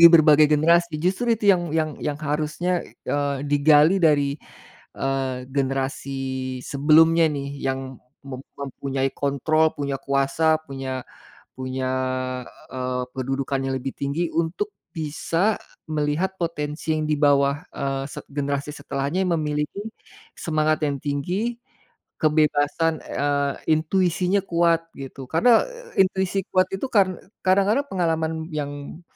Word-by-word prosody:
berbagai 155 Hz, -1 st, +6 dB
generasi. 165 Hz, +2 st, +3 dB
Justru 185 Hz, +9 st, 0 dB
itu 205 Hz, -2 st, +4 dB
yang 175 Hz, -4 st, 0 dB
yang 155 Hz, -1 st, +1 dB
yang 150 Hz, -1 st, -2 dB
harusnya, 155 Hz, +4 st, -1 dB
e -, -, -19 dB
eee, 140 Hz, -1 st, -1 dB
digali 150 Hz, +5 st, +5 dB
dari, 145 Hz, -3 st, +2 dB, 0.6 s
eee, 135 Hz, -2 st, -1 dB
generasi 135 Hz, 0 st, -2 dB, 0.4 s
sebelumnya 160 Hz, +4 st, +5 dB
nih, 140 Hz, -1 st, -4 dB
yang 135 Hz, 0 st, -1 dB, 0.5 s
mem 130 Hz, -2 st, -6 dB, 0.2 s
mempunyai 135 Hz, 0 st, -2 dB
kontrol, 155 Hz, +3 st, +1 dB
punya 140 Hz, -1 st, -2 dB
kuasa, 140 Hz, +3 st, +2 dB
punya 135 Hz, -2 st, -4 dB, 0.5 s
punya, 130 Hz, 0 st, -3 dB, 0.8 s
eee, 125 Hz, -1 st, -2 dB
kedudukan 135 Hz, +1 st, -2 dB
yang -, -, 0 dB
lebih 135 Hz, +1 st, -4 dB
tinggi 150 Hz, +5 st, -1 dB
untuk 170 Hz, -, -1 dB, 0.2 s
bisa 165 Hz, +5 st, 0 dB, 0.4 s
melihat 155 Hz, +5 st, 0 dB
potensi 155 Hz, -2 st, -3 dB
yang 155 Hz, -, -1 dB
di -, -, +4 dB
bawah, 140 Hz, 0 st, +3 dB
eee, 135 Hz, -1 st, -3 dB
se -, -, -7 dB
generasi 140 Hz, 0 st, -2 dB
setelahnya 145 Hz, +4 st, -2 dB
yang 175 Hz, -, +2 dB
memiliki 150 Hz, +4 st, -2 dB, 0.6 s
semangat 155 Hz, -1 st, +1 dB
yang 140 Hz, -1 st, -2 dB
tinggi, 175 Hz, +11 st, -2 dB, 0.6 s
kebebasan, 155 Hz, +1 st, +2 dB
eee, 140 Hz, 0 st, 0 dB, 0.2 s
intuisinya 180 Hz, +3 st, +1 dB
kuat, 170 Hz, -2 st, +2 dB
gitu. 135 Hz, 0 st, -8 dB
Karena, 225 Hz, +9 st, +5 dB
eee, -, -, 0 dB
intuisi 190 Hz, +1 st, -1 dB
kuat 185 Hz, 0 st, +5 dB
itu 195 Hz, -, -2 dB
kar 200 Hz, -4 st, +5 dB, 0.4 s
kadang-kadang 200 Hz, +7 st, +4 dB
pengalaman 165 Hz, -3 st, 0 dB, 0.2 s
yang 145 Hz, +1 st, -5 dB
150 Hz, 120 wpm, -23 LUFS, 140-170 Hz, 0.8 s, berbagai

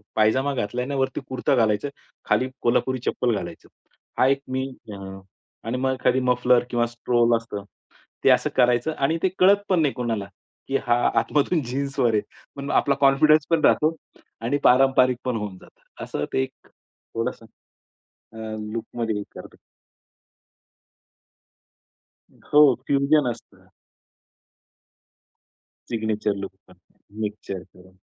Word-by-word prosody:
पायजामा 130 Hz, +6 st, +2 dB
घातला 120 Hz, -1 st, -2 dB
आणि 140 Hz, +3 st, -3 dB
वरती 135 Hz, 0 st, -1 dB
कुर्ता 130 Hz, +2 st, 0 dB
घालायचं, 110 Hz, +2 st, +1 dB, 0.4 s
खाली 130 Hz, -, +1 dB
कोल्हापुरी 130 Hz, +2 st, +1 dB
चप्पल 120 Hz, -3 st, 0 dB
घालायचं. 85 Hz, -4 st, -7 dB, 0.5 s
हा 130 Hz, -, +4 dB
एक 135 Hz, +1 st, +2 dB
मी 130 Hz, +1 st, -2 dB, 0.3 s
अ, -, -, -7 dB, 0.7 s
आणि 120 Hz, +3 st, -1 dB
मग 130 Hz, +1 st, 0 dB
खाली 130 Hz, +1 st, +2 dB
मफलर 125 Hz, -1 st, +3 dB
किंवा 120 Hz, -1 st, +1 dB
स्ट्रोल 120 Hz, 0 st, +2 dB
असतं 110 Hz, -3 st, -7 dB, 0.6 s
ते -, -, +5 dB
असं -, -, +3 dB
करायचं 125 Hz, +5 st, +3 dB
आणि 150 Hz, +4 st, +1 dB
ते 190 Hz, -, +4 dB
कळत 190 Hz, +2 st, +7 dB
पण 180 Hz, -3 st, +3 dB
नाही 145 Hz, -3 st, +1 dB
कोणाला, 115 Hz, -5 st, -2 dB, 0.4 s
की 135 Hz, -, +1 dB
हा 120 Hz, -, +4 dB, 0.2 s
आतमधून 150 Hz, +7 st, +1 dB
जीन्सवर 135 Hz, -1 st, -1 dB
आहे. 105 Hz, -, +2 dB, 0.3 s
पण 140 Hz, 0 st, -6 dB
आपला 140 Hz, -1 st, +2 dB
कॉन्फिडन्स 150 Hz, +2 st, +5 dB
पण 165 Hz, -2 st, +2 dB
राहतो 155 Hz, +2 st, +3 dB, 0.5 s
आणि 120 Hz, +5 st, 0 dB
पारंपरिक 130 Hz, -1 st, +4 dB
पण 125 Hz, -2 st, -1 dB
होऊन 105 Hz, -3 st, -5 dB
जातं. -, -, -20 dB, 0.2 s
असं 75 Hz, -, -3 dB
ते -, -, +2 dB
एक 130 Hz, 0 st, -11 dB
थोडंसं, 115 Hz, 0 st, -7 dB, 0.9 s
अ, -, -, -14 dB, 0.4 s
लूकमध्ये 115 Hz, -2 st, -3 dB
करतो. -, -, -11 dB, 3.0 s
हो, 150 Hz, -, +8 dB, 0.3 s
फ्युजन 140 Hz, 0 st, +3 dB
असतं. -, -, -13 dB, 2.2 s
सिग्नेचर 110 Hz, -2 st, -1 dB
लूक 100 Hz, 0 st, -6 dB, 0.2 s
पण 90 Hz, -, -18 dB, 0.5 s
मिक्सचर. 105 Hz, -3 st, -4 dB
हो. 95 Hz, +1 st, -18 dB
125 Hz, 130 wpm, -24 LUFS, 115-135 Hz, 3.0 s, हो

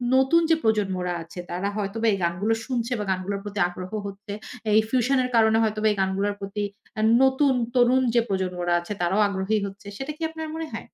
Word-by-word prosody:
নতুন 265 Hz, +6 st, +4 dB
যে 325 Hz, -, +6 dB
প্রজন্মরা 190 Hz, -5 st, 0 dB
আছে, 170 Hz, +2 st, -11 dB
তারা 185 Hz, +3 st, -2 dB
হয়তোবা 215 Hz, +3 st, -1 dB
এই -, -, 0 dB
গানগুলো 180 Hz, +6 st, +1 dB
শুনছে 245 Hz, -1 st, -2 dB
বা -, -, -1 dB
গানগুলোর 190 Hz, +2 st, -2 dB
প্রতি 205 Hz, 0 st, -5 dB
আগ্রহ 185 Hz, +1 st, -8 dB, 0.2 s
হচ্ছে। 200 Hz, +1 st, -8 dB, 0.4 s
এই 220 Hz, -, +7 dB
ফিউশনের 255 Hz, +1 st, +2 dB
কারণে 220 Hz, 0 st, +5 dB
হয়তোবা 215 Hz, 0 st, +1 dB
এই 205 Hz, -, -3 dB
গানগুলোর 195 Hz, +2 st, 0 dB
প্রতি 200 Hz, +1 st, -3 dB, 0.4 s
আ -, -, +1 dB, 0.2 s
নতুন 265 Hz, +1 st, +4 dB, 0.2 s
তরুণ 250 Hz, +1 st, +5 dB
যে 235 Hz, -, +6 dB
প্রজন্মরা 180 Hz, -2 st, -1 dB
আছে, 175 Hz, +4 st, -5 dB
তারাও 190 Hz, +5 st, +2 dB
আগ্রহী 200 Hz, +2 st, 0 dB
হচ্ছে। 200 Hz, +1 st, -9 dB
সেটা 270 Hz, +3 st, -4 dB
কি -, -, -20 dB
আপনার 320 Hz, 0 st, -6 dB
মনে 320 Hz, -1 st, -4 dB
হয়? -, -, -6 dB
210 Hz, 190 wpm, -25 LUFS, 190-245 Hz, 0.4 s, এই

